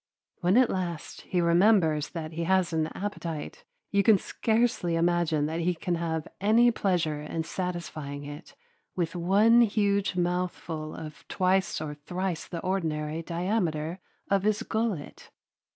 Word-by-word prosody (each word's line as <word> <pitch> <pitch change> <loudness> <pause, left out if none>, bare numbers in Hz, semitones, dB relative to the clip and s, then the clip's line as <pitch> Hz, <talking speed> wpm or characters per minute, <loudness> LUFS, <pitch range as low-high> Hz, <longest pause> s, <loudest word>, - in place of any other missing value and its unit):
When 180 +5 +3
at 255 -2 +5
last 175 -4 -4
he 180 -2 +2
remembers 170 -3 +4
that 160 -2 -5
he 165 +1 -3
has 185 -1 +2
an 160 -1 +1
appetite, 170 -6 -5 0.3
you 200 - +4
can 215 0 +6
scarcely 220 -5 0
imagine 165 -3 +2
that 160 +2 -2
he 175 +1 +1
can 175 +2 -2
have 165 -2 -2
any 230 +4 +5
pleasure 170 -8 0
in 160 +2 -3
satisfying 160 -5 -4
it 145 +3 -10 0.4
with 170 -1 -1
one 205 +7 +5
huge 200 -3 +2
mouthful 175 -3 -2
of 155 -2 -9
twice 185 0 +1
or 150 -1 -4
thrice 175 +4 -4
the 170 - -5
ordinary 160 -4 -1
diameter 170 -2 -1 0.3
of 195 -1 +2
his 210 +1 +1
gullet. 220 -9 -3
175 Hz, 140 wpm, -28 LUFS, 160-195 Hz, 0.4 s, can